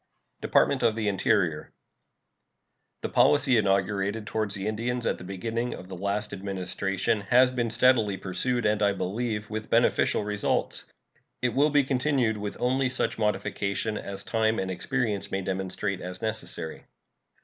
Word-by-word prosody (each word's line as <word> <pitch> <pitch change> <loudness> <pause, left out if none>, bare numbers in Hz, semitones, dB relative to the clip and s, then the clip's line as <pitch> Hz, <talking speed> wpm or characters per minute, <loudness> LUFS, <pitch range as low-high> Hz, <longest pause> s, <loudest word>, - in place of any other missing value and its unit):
DEPARTMENT - - +3
OF 110 - +3
THE 110 -2 -1
INTERIOR. 100 -2 +1 1.3
The - - -3
policy 145 -3 +4
inaugurated 100 +1 +1
toward 110 0 -1
the 100 -1 -2
Indians 120 +3 -2
at - - 0
the - - -9
beginning 115 +6 -3
of 90 - -11
the 95 - -6
last 100 +3 -2
Administration 95 +1 -2
has 125 +1 +6
been 120 -2 -1
steadily 115 -4 +3
pursued, 120 +7 -1
and, 105 0 +2
I 100 -1 +3
believe, 105 +3 -3
with 110 0 -4
beneficial 115 -2 +3
results. 105 0 -1 0.6
It 125 - +3
will 145 +5 +3
be 145 -1 +4
continued 130 -4 +1
with 105 0 -5
only 130 +1 +1
such 125 - -1
modifications 105 0 -1
as 100 -1 -6
time 110 -1 +1
and 95 0 -2
experience 105 +2 -1
may 95 - -2
demonstrate 95 +1 -2
as 90 0 -6
necessary. 110 -7 -4
105 Hz, 150 wpm, -27 LUFS, 100-120 Hz, 1.3 s, has